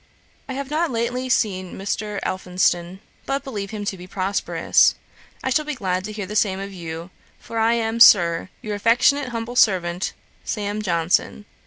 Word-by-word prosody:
'I -, -, -3 dB
have 275 Hz, +1 st, -5 dB
not 325 Hz, +2 st, +1 dB
lately 245 Hz, +1 st, -2 dB
seen 185 Hz, -6 st, 0 dB
Mr. 205 Hz, +1 st, -3 dB
Elphinston, 180 Hz, 0 st, 0 dB, 0.3 s
but 275 Hz, 0 st, -1 dB
believe 210 Hz, -8 st, -5 dB
him 210 Hz, -1 st, -5 dB
to 200 Hz, -, -2 dB
be 180 Hz, 0 st, -11 dB
prosperous. 195 Hz, +1 st, +2 dB, 0.5 s
I 260 Hz, -, -1 dB
shall 305 Hz, +4 st, +2 dB
be 300 Hz, -1 st, -4 dB
glad 185 Hz, -4 st, -2 dB
to 215 Hz, -, -5 dB
hear 210 Hz, -2 st, -5 dB
the 210 Hz, +3 st, -7 dB
same 195 Hz, -3 st, +2 dB
of 195 Hz, 0 st, -6 dB
you, 170 Hz, 0 st, -7 dB, 0.3 s
for 230 Hz, -, -5 dB
I 225 Hz, +1 st, +3 dB
am, 230 Hz, 0 st, -1 dB
Sir, 175 Hz, -6 st, +6 dB
'Your 215 Hz, -, -3 dB
affectionate 245 Hz, +6 st, +3 dB
humble 235 Hz, 0 st, -5 dB
servant, 180 Hz, -6 st, +2 dB, 0.3 s
'SAM. 210 Hz, 0 st, -3 dB
JOHNSON.' 175 Hz, +2 st, 0 dB
205 Hz, 170 wpm, -22 LUFS, 185-235 Hz, 0.5 s, Sir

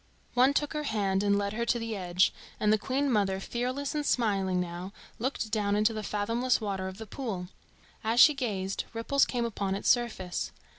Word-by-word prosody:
] -, -, -35 dB
One 260 Hz, +3 st, +4 dB
took 295 Hz, 0 st, 0 dB
her 300 Hz, -, -1 dB
hand 200 Hz, -5 st, +1 dB
and 200 Hz, 0 st, +3 dB
led 200 Hz, 0 st, -1 dB
her 235 Hz, +2 st, -1 dB
to 235 Hz, +1 st, +1 dB
the 230 Hz, -1 st, -3 dB
edge, 180 Hz, -1 st, +2 dB, 0.3 s
and 210 Hz, 0 st, +3 dB
the 215 Hz, -, +2 dB
Queen 270 Hz, +6 st, 0 dB
mother, 195 Hz, -4 st, +1 dB
fearless 255 Hz, +6 st, -3 dB
and 300 Hz, -1 st, -1 dB
smiling 195 Hz, -8 st, +1 dB
now, 180 Hz, +2 st, -4 dB, 0.3 s
looked 235 Hz, -2 st, -2 dB
down 205 Hz, -2 st, +1 dB
into 215 Hz, +2 st, +3 dB
the 215 Hz, -, -3 dB
fathomless 230 Hz, +5 st, 0 dB
water 195 Hz, -4 st, -3 dB
of 190 Hz, 0 st, -7 dB
the 220 Hz, -, -7 dB
pool. 205 Hz, -6 st, -5 dB, 0.5 s
As 225 Hz, +2 st, +1 dB
she 300 Hz, -, +9 dB
gazed, 200 Hz, -8 st, -2 dB
ripples 270 Hz, +5 st, +2 dB
came 240 Hz, -2 st, -1 dB
upon 200 Hz, -4 st, -2 dB
its 200 Hz, -, -1 dB
surface. 215 Hz, -7 st, 0 dB
215 Hz, 200 wpm, -29 LUFS, 195-245 Hz, 0.5 s, she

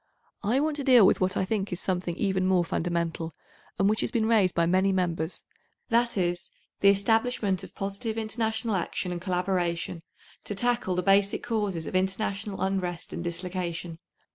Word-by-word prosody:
I 235 Hz, +6 st, +2 dB
want 300 Hz, 0 st, 0 dB
to 285 Hz, -, -3 dB
deal 250 Hz, -6 st, +7 dB
with -, -, +3 dB
what 185 Hz, +1 st, +1 dB
I 190 Hz, -, +1 dB
think 200 Hz, -1 st, -2 dB
is 180 Hz, -, -3 dB
something 180 Hz, -3 st, -2 dB
even 190 Hz, -1 st, 0 dB
more 185 Hz, -2 st, +3 dB
fundamental, 165 Hz, -1 st, -2 dB, 0.4 s
and 195 Hz, -, +3 dB
which 215 Hz, +1 st, +2 dB
has -, -, 0 dB
been 230 Hz, -2 st, 0 dB
raised 215 Hz, -5 st, +3 dB
by 170 Hz, -, +3 dB
many 185 Hz, +3 st, +3 dB
Members, 175 Hz, -3 st, -1 dB, 0.5 s
that 235 Hz, -1 st, +2 dB
is, 175 Hz, -1 st, -1 dB, 0.3 s
the 200 Hz, -, +6 dB
establishment 205 Hz, -1 st, +2 dB
of -, -, -11 dB
positive 200 Hz, +3 st, -3 dB
international 220 Hz, 0 st, -1 dB
action 180 Hz, 0 st, -2 dB
and 175 Hz, -1 st, -4 dB
collaboration 180 Hz, -2 st, -1 dB, 0.4 s
to 205 Hz, -, -3 dB
tackle 240 Hz, -4 st, 0 dB
the 180 Hz, -, 0 dB
basic 195 Hz, +1 st, +3 dB
causes 205 Hz, -8 st, -1 dB
of -, -, -5 dB
international 195 Hz, +2 st, -1 dB
unrest 185 Hz, -3 st, -2 dB
and 170 Hz, -, -4 dB
dislocation. 175 Hz, -1 st, -4 dB
190 Hz, 170 wpm, -27 LUFS, 175-215 Hz, 0.5 s, deal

